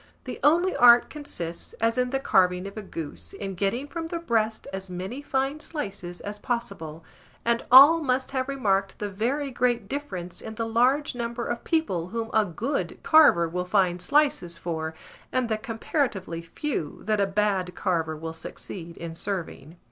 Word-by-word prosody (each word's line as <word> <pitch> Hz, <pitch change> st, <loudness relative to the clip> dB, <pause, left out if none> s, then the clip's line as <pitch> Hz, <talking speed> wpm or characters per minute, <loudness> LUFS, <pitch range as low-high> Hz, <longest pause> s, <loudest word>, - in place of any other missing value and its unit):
The -, -, -6 dB
only 345 Hz, +5 st, +4 dB
art 240 Hz, 0 st, +7 dB
consists, 175 Hz, -, -7 dB
as 230 Hz, +1 st, 0 dB
in 250 Hz, 0 st, +1 dB
the 270 Hz, +1 st, 0 dB
carving 180 Hz, -6 st, +2 dB
of 200 Hz, -, -7 dB
a 215 Hz, -, -5 dB
goose, 145 Hz, -, -8 dB
in 195 Hz, -1 st, -5 dB
getting 200 Hz, +9 st, -1 dB
from 330 Hz, +2 st, -5 dB
the 340 Hz, -, -3 dB
breast 225 Hz, -9 st, 0 dB
as 190 Hz, 0 st, -5 dB
many 185 Hz, +9 st, -5 dB
fine 270 Hz, +1 st, -1 dB
slices 195 Hz, -, -5 dB
as 205 Hz, 0 st, -6 dB
possible; 170 Hz, -10 st, -4 dB, 0.4 s
and 235 Hz, 0 st, +1 dB
all 285 Hz, +6 st, +10 dB
must 260 Hz, -2 st, 0 dB
have 260 Hz, 0 st, -1 dB
remarked 200 Hz, -8 st, 0 dB
the 205 Hz, -1 st, -4 dB
very 265 Hz, +8 st, -1 dB
great 240 Hz, -3 st, 0 dB
difference 195 Hz, -11 st, -5 dB
in 220 Hz, -, -7 dB
the 230 Hz, -, -2 dB
large 250 Hz, +6 st, +2 dB
number 235 Hz, -1 st, -3 dB
of 240 Hz, 0 st, -3 dB
people 195 Hz, -, 0 dB
whom 225 Hz, +2 st, -4 dB
a 220 Hz, -1 st, +4 dB
good 215 Hz, -, -3 dB
carver 300 Hz, -, +6 dB
will 180 Hz, +2 st, -2 dB
find 180 Hz, -2 st, +1 dB
slices 225 Hz, -, +2 dB
for, 160 Hz, -2 st, -4 dB, 0.4 s
and 255 Hz, -2 st, 0 dB
the 220 Hz, -, +1 dB
comparatively 225 Hz, -, -2 dB
few 165 Hz, -, -4 dB
that 215 Hz, -1 st, +1 dB
a 200 Hz, -, +2 dB
bad 195 Hz, -2 st, 0 dB
carver 160 Hz, -3 st, -1 dB
will 160 Hz, +1 st, -5 dB
succeed 165 Hz, +1 st, -8 dB
in 170 Hz, -1 st, -6 dB
serving. 170 Hz, -4 st, -5 dB
215 Hz, 170 wpm, -26 LUFS, 180-260 Hz, 0.4 s, all